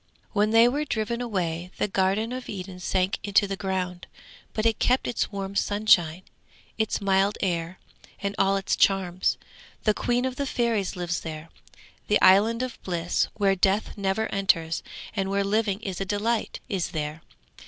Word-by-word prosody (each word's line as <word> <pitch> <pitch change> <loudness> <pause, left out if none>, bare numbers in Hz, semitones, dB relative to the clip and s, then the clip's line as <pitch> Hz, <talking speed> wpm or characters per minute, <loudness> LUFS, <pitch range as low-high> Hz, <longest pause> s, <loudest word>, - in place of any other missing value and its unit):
'When 210 0 +2
they 225 +2 +6
were 285 +5 0
driven 235 -3 -2
away 180 -7 -2
the - - +1
Garden 195 +4 +1
of 255 0 -6
Eden 185 -2 -6
sank 185 +1 0
into 205 0 +3
the 195 0 -3
ground, 185 -2 -3 0.4
but 215 - -2
it 225 -2 +2
kept 255 +1 +2
its 235 - -1
warm 195 -1 -5
sunshine, 190 -5 +3 0.5
its 220 -1 0
mild 195 +1 +2
air, 175 -1 -2 0.4
and 200 0 -2
all 195 0 +3
its 195 - 0
charms. 185 -2 +2 0.5
The 215 - +3
queen 245 +3 0
of 260 0 -3
the 280 - -1
fairies 230 -7 0
lives 175 -1 -2
there. 160 0 -7 0.6
The 210 - +3
Island 215 +6 +5
of 255 -2 -6
Bliss, 175 -1 0
where 195 -2 +2
death 195 +3 +1
never 200 +2 0
enters, 165 -5 +1 0.3
and 195 -2 -1
where 200 0 +1
living 205 0 0
is 195 -4 -4
a - - +2
delight, 210 +3 -1
is 195 -7 -1
there. 150 +1 -3
195 Hz, 165 wpm, -26 LUFS, 185-220 Hz, 0.6 s, they